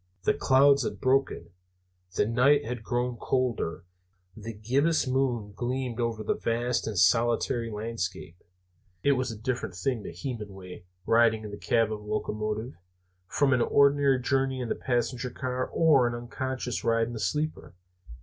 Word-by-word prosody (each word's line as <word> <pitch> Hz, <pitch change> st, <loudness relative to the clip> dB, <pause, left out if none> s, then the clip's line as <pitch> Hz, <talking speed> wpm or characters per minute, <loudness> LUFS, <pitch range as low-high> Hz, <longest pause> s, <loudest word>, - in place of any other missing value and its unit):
The -, -, +3 dB
clouds 140 Hz, +1 st, +4 dB
had -, -, -3 dB
broken; 135 Hz, -3 st, 0 dB, 0.6 s
the -, -, +2 dB
night 135 Hz, +6 st, +3 dB
had 125 Hz, 0 st, -4 dB
grown 120 Hz, +2 st, -2 dB
colder; 120 Hz, -12 st, -1 dB, 0.5 s
the 110 Hz, +1 st, -7 dB
gibbous 135 Hz, +11 st, +1 dB
moon 125 Hz, -6 st, -1 dB
gleamed 125 Hz, 0 st, -3 dB
over 115 Hz, -2 st, -1 dB
the -, -, +1 dB
vast 120 Hz, +1 st, -1 dB
and 110 Hz, -3 st, -3 dB
solitary 115 Hz, +5 st, +2 dB
landscape. 95 Hz, -5 st, -5 dB, 0.6 s
It 140 Hz, -, +4 dB
was 130 Hz, -3 st, 0 dB
a 110 Hz, -, -7 dB
different 115 Hz, -4 st, -3 dB
thing 115 Hz, +6 st, -1 dB
to -, -, -7 dB
Hemenway, 100 Hz, -9 st, -7 dB, 0.2 s
riding 115 Hz, -1 st, +3 dB
in 105 Hz, -, -7 dB
the -, -, -5 dB
cab 115 Hz, -2 st, +1 dB
of 110 Hz, -, -3 dB
the 105 Hz, -, -14 dB
locomotive, 105 Hz, +2 st, -3 dB, 0.5 s
from 140 Hz, +5 st, +2 dB
an 125 Hz, -, +2 dB
ordinary 140 Hz, 0 st, +4 dB
journey 135 Hz, 0 st, 0 dB
in 125 Hz, -2 st, -4 dB
the -, -, 0 dB
passenger 125 Hz, 0 st, -1 dB
car 130 Hz, +1 st, -3 dB
or 145 Hz, -7 st, +4 dB
an 120 Hz, -, -2 dB
unconscious 125 Hz, 0 st, -4 dB
ride 115 Hz, 0 st, +2 dB
in 120 Hz, -, -7 dB
the 115 Hz, -, -5 dB
sleeper. 150 Hz, -, -2 dB
120 Hz, 160 wpm, -28 LUFS, 110-130 Hz, 0.6 s, clouds